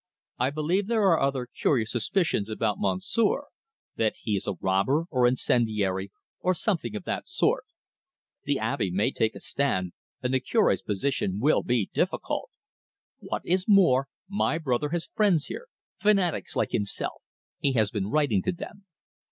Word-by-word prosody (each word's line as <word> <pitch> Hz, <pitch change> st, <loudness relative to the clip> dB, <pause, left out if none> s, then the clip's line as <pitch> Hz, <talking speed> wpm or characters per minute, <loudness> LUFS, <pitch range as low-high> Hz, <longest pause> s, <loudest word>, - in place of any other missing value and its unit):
I 125 Hz, +2 st, +2 dB
believe 160 Hz, +7 st, 0 dB
there 225 Hz, -2 st, +2 dB
are 165 Hz, -, +4 dB
other 135 Hz, -2 st, 0 dB
curious 125 Hz, -2 st, 0 dB
suspicions 130 Hz, -, 0 dB
about 110 Hz, -1 st, -1 dB
Monsieur: 100 Hz, -, +1 dB, 0.5 s
that 110 Hz, -1 st, +1 dB
he 105 Hz, -, 0 dB
is 100 Hz, -, -3 dB
a 100 Hz, -, -1 dB
robber, 100 Hz, +12 st, +2 dB
or 125 Hz, -4 st, +4 dB
incendiary, 105 Hz, -6 st, +1 dB, 0.3 s
or 185 Hz, 0 st, +1 dB
something 165 Hz, -, -1 dB
of 105 Hz, -, -4 dB
the -, -, -2 dB
sort. -, -, +1 dB, 0.8 s
The -, -, +1 dB
Abbe 95 Hz, -, -1 dB
may 100 Hz, +8 st, +1 dB
take 110 Hz, -4 st, 0 dB
a -, -, -7 dB
stand, 95 Hz, -11 st, -1 dB, 0.3 s
and 125 Hz, +1 st, 0 dB
the 130 Hz, -, +4 dB
Cure's 220 Hz, -, +2 dB
position 105 Hz, -2 st, -1 dB
will 145 Hz, +7 st, +3 dB
be 120 Hz, -5 st, 0 dB
difficult. 190 Hz, -, -1 dB, 0.7 s
What -, -, -4 dB
is 185 Hz, +2 st, +1 dB
more, 170 Hz, -, +5 dB, 0.2 s
my 200 Hz, -4 st, 0 dB
brother 145 Hz, -2 st, 0 dB
has 170 Hz, +1 st, -2 dB
friends 195 Hz, -9 st, +2 dB
here, 485 Hz, +1 st, -7 dB, 0.3 s
fanatics 195 Hz, -5 st, +1 dB
like -, -, 0 dB
himself. 100 Hz, -1 st, -2 dB, 0.4 s
He 140 Hz, -, +1 dB
has 110 Hz, -4 st, +2 dB
been 100 Hz, -2 st, -2 dB
writing 140 Hz, -8 st, +2 dB
to -, -, 0 dB
them. 195 Hz, +3 st, -9 dB
130 Hz, 160 wpm, -27 LUFS, 105-175 Hz, 0.8 s, more